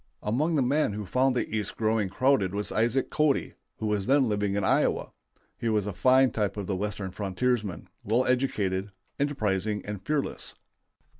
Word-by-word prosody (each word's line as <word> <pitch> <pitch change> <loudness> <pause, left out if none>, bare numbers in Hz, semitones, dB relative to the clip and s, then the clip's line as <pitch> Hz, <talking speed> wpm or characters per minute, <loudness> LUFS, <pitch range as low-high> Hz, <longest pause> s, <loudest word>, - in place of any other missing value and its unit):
Among 145 +10 +1
the 140 - +3
men 135 -3 +1
who 105 0 -4
found 130 +5 +2
the 125 - 0
East 105 -2 -3
growing 110 -2 +1
crowded 100 -4 +2
was 105 0 -2
Isaac 115 +4 +1
Cody, 150 -2 +1 0.2
who - - -4
was 105 -1 0
then 135 -1 +4
living 105 -2 0
in 100 - 0
Iowa. - - +1 0.5
He 115 - -1
was 105 -3 +1
a 105 - -3
fine 130 +5 +4
type 105 -2 -1
of 100 - -3
the 95 - -2
Western 100 -1 -3
frontiersman, 105 +1 -1 0.2
well 115 +5 +2
educated, 105 -7 0 0.3
enterprising, 105 -8 -1
and 105 -2 -5
fearless. 150 +6 -2
110 Hz, 170 wpm, -27 LUFS, 100-130 Hz, 0.5 s, then